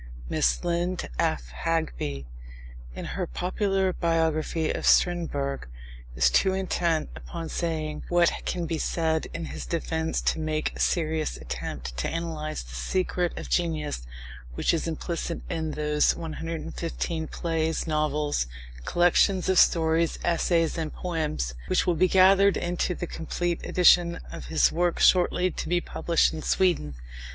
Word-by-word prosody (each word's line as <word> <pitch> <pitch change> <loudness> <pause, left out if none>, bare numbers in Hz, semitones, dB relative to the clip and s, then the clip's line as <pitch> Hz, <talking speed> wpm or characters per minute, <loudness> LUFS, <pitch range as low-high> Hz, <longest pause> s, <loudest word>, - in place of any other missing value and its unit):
Miss - - +1
Lind 175 +1 -1
af 60 -1 0
Hageby, 155 - -1 0.7
in - - -6
her - - -3
popular 190 - 0
biography 160 -1 0
of - - -2
Strindberg, 145 - +2 0.5
is 60 0 +4
too 190 - +3
intent 170 -4 0
upon 165 -2 -7
saying 155 -3 -2
what 175 -1 +4
can 175 -2 -2
be 165 -1 -2
said 160 -1 0
in 170 -1 -5
his - - -7
defence 160 -1 -1
to - - 0
make 155 -1 -1
a - - -9
serious 160 -2 0
attempt - - -6
to - - -1
analyse 160 - -4
the - - -12
secret 180 - -1
of - - -6
genius 155 - -1 0.5
which - - +1
is 165 0 -1
implicit 165 +1 -3
in 160 -1 -2
those 150 0 +2
"115 165 0 -4
plays, 160 -1 -1
novels, 150 - 0 0.4
collections 175 +2 +3
of 190 - +5
stories, 165 0 +3
essays, 165 -1 +1
and 155 -2 -4
poems" 115 - -2
which - - +2
will 175 - +3
be 175 +3 +3
gathered 195 +1 +5
into 175 +1 -1
the 175 - -4
complete 170 +1 -3
edition 175 -1 +4
of - - -7
his 160 - +3
works 175 +1 +2
shortly 180 0 +4
to - - -5
be 175 0 +3
published 170 -1 +1
in 160 - -5
Sweden. 160 - +1
165 Hz, 140 wpm, -26 LUFS, 155-175 Hz, 0.7 s, of